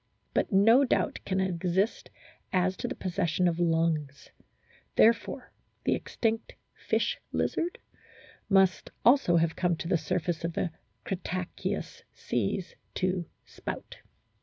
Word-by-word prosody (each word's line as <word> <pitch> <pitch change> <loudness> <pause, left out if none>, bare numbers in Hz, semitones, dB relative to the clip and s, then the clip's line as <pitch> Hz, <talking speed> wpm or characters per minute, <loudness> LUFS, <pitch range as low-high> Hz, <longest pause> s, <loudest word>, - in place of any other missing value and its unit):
But - - +1
no 225 +7 +6
doubt 260 - +1
can 190 -1 +1
exist 190 +2 0 0.4
as 185 0 +2
to - - -3
the - - -4
possession 180 -1 0
of 170 -1 0
lungs. 165 -4 0 0.6
Therefore 230 +1 +3 0.3
the - - +2
extinct 225 0 -2 0.2
"fish - - -1
lizard" 345 +2 -1 1.3
also 245 -6 +5
must - - +6
have 165 -1 +1
come 175 -2 +1
to 165 - -5
the 170 - +2
surface 175 -2 -2
of 170 0 -2
the 170 - -1 0.3
Cretaceous 185 -1 -4
seas 125 - -2 0.2
to 185 -2 0 0.2
"spout." - - -7
180 Hz, 120 wpm, -29 LUFS, 170-195 Hz, 1.3 s, no